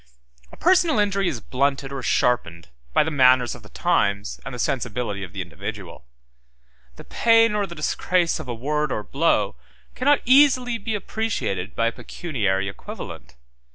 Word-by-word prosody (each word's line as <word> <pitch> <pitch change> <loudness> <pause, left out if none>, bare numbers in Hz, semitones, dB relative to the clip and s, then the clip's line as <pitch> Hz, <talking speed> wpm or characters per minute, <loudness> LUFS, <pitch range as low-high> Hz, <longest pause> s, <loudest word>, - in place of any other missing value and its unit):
A - - -14
personal 350 -2 +3
injury 200 -2 +1
is 135 -10 -3
blunted 135 +2 -1
or 135 -1 -5
sharpened 85 - 0 0.2
by - - +4
the 160 - -3
manners 130 -3 +4
of - - -11
the 105 - -15
times 100 - 0
and - - -7
the 125 - -6
sensibility 120 -6 -2
of 90 - -8
the 95 0 -4
individual: 85 -6 -8 0.9
the - - -11
pain 230 -1 +3
or 205 -1 0
the 170 - -9
disgrace 170 +3 0
of 155 - -8
a 120 - -4
word 150 +4 -1
or 105 - -2
blow 155 +9 +1 0.4
cannot 285 +3 +2
easily 255 -2 +4
be 220 +1 -3
appreciated 200 - -3
by 115 - +1
a 115 - +2
pecuniary 105 - -2
equivalent. 100 -9 -9
140 Hz, 160 wpm, -23 LUFS, -, 0.9 s, by